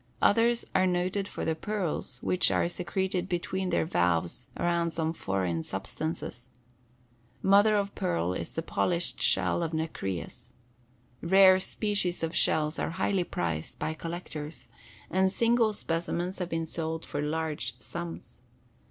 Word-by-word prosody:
Others 230 +2 +4
are 185 0 +4
noted 185 +2 0
for - - -5
the 160 - +2
pearls 175 -7 -3
which 180 - +4
are - - +2
secreted 185 +1 -2
between 185 +1 -1
their - - +2
valves 90 - 0
around 170 -1 +1
some 160 -1 -1
foreign 95 - -1
substances. 120 - -4 0.9
Mother 205 +2 +6
of 200 -1 0
pearl 85 +1 0
is 85 - -4
the 165 - -4
polished 170 +1 0
shell - - +3
of 165 -1 -2
nacreous. 120 - -4 0.7
Rare 190 +1 +7
species 190 -3 0
of 165 +1 -2
shells 155 0 +2
are - - 0
highly 195 -3 +1
prized 85 - -3
by 155 - -2
collectors, 165 -2 -6 0.4
and 190 0 +3
single 230 0 +3
specimens 175 -1 -2
have 180 -2 -2
been 165 -1 -1
sold 160 0 -3
for 145 - -3
large 150 -6 -2
sums. 170 -1 -7
170 Hz, 135 wpm, -29 LUFS, 150-190 Hz, 0.9 s, Rare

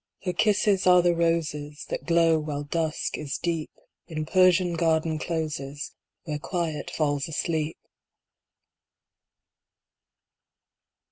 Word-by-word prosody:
Her 180 -2 -1
kisses 205 -2 +2
are 180 -1 +7
the 175 -1 +4
roses 155 -3 -1
That - - -4
glow 165 -1 +4
while 150 -1 -4
dusk 160 +1 -2
is 145 -3 -3
deep 165 -3 -2 0.4
In 155 -2 -4
Persian 185 0 +4
garden 160 -1 +1
closes 150 -4 -4 0.3
Where 150 -3 -4
Quiet 160 -3 -3
falls 145 -3 0
asleep. 160 -1 -2
160 Hz, 105 wpm, -26 LUFS, 150-170 Hz, 0.4 s, are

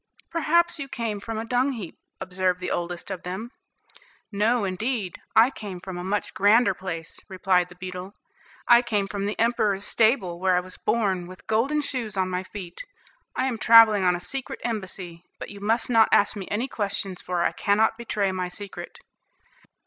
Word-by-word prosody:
"Perhaps 340 +1 +2
you 280 - -4
came 230 -5 -3
from 225 +2 -5
a 220 - -3
dung 250 +3 +1
heap," 205 -9 -8 0.2
observed 185 -1 -1
the 180 - -4
oldest 175 +2 -3
of 185 - -5
them. 190 +7 -6 0.8
"No, 220 +3 +2
indeed, 200 +1 -2
I 230 +4 +6
came 200 -8 -7
from 180 0 -7
a - - -5
much 200 +2 -2
grander 205 +1 +4
place," 170 -3 -6
replied 185 -2 +1
the 175 - -14
beetle; 185 +2 -7 0.5
"I 240 0 +7
came 210 -5 0
from 200 0 -3
the 210 - -4
emperor's 220 -4 +1
stable, 220 -8 +2
where 185 0 +2
I - - +4
was 185 0 -8
born, 190 -6 0
with 185 0 -13
golden 270 +8 +1
shoes 235 -8 -4
on 185 -1 0
my 180 0 -1
feet. 185 -2 -8 0.5
I 255 - 0
am 245 -4 -2
travelling 225 -4 +7
on 180 -1 +3
a - - -4
secret 265 +8 -4
embassy, 185 -6 -4
but - - -8
you 200 - -10
must 225 +3 +1
not 225 -2 +5
ask 205 - +4
me 195 -3 -6
any 230 +6 -1
questions, 200 -5 -2
for 175 -1 -1
I - - +2
cannot 215 +2 +2
betray 210 -4 -1
my 185 -1 -2
secret." 200 +2 -8
205 Hz, 185 wpm, -25 LUFS, 185-230 Hz, 0.8 s, I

